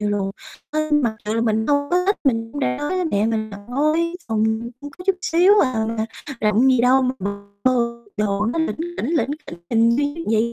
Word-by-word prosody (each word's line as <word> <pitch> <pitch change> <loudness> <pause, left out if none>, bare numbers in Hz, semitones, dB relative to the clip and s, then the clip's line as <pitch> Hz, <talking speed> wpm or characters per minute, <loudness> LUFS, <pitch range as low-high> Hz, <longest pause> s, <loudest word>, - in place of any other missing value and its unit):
Như 210 - 0
luôn 200 -1 -1 0.4
à, 310 - 0
mặc 240 -7 +2
dù 215 - -1
là 230 - +1
mình 220 -1 +1
hông 285 0 +1
có 360 +1 +2
thích, 400 - +3
mình 230 -3 +1
đã 125 -1 0
nói 295 - -3
với 370 -1 0
mẹ 210 -10 +1
mình 220 -1 -1
là 200 - -8
"Thôi, 305 +6 +1
phòng 220 -1 +1 0.4
con 290 0 -8
có 360 - -9
chút 390 - +3
xíu 355 +4 +4
à, 225 -5 +1 0.5
rộng 215 +4 +3
gì 255 -2 +4
đâu 255 +2 +4
mà 255 - +1 0.6
vô 235 -2 +2 0.2
đồ 210 0 0
nó 240 +8 -1
lỉnh 320 - 0 0.2
kỉnh, 265 - -2
lỉnh 310 - +1 0.4
kỉnh 235 0 +2
240 Hz, 200 wpm, -21 LUFS, 220-295 Hz, 0.6 s, xíu